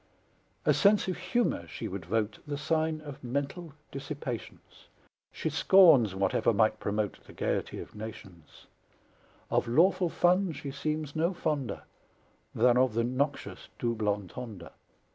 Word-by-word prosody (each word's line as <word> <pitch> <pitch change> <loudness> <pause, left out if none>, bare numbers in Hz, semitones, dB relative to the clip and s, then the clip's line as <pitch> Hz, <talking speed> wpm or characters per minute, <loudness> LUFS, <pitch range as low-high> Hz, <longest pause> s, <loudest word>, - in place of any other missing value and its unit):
A - - +5
sense 205 -1 +4
of 185 - -1
humor 185 - 0
she - - -6
would 95 -3 -6
vote 110 +1 -1
The 145 -1 -3
sign 155 +1 0
of 145 -3 -10
mental 140 +6 -3 0.2
dissipations; 135 -4 -7 0.4
She 160 - -3
scorns 145 - +6
whatever 95 +4 +2
might 110 +1 +3
promote 105 0 -2
The - - -14
gaiety - - -2
of - - -9
nations; 100 -6 -10 0.9
Of - - +1
lawful 175 +8 +3
fun 180 +1 +2
she 140 -1 -6
seems 150 +1 -3
no 170 +4 +1
fonder 145 -7 -2 0.7
Than 120 +1 +4
of 130 -4 +2
the 115 - +2
noxious 135 +4 -2
dooblontonder! 105 -3 -3
135 Hz, 130 wpm, -29 LUFS, 110-160 Hz, 0.9 s, scorns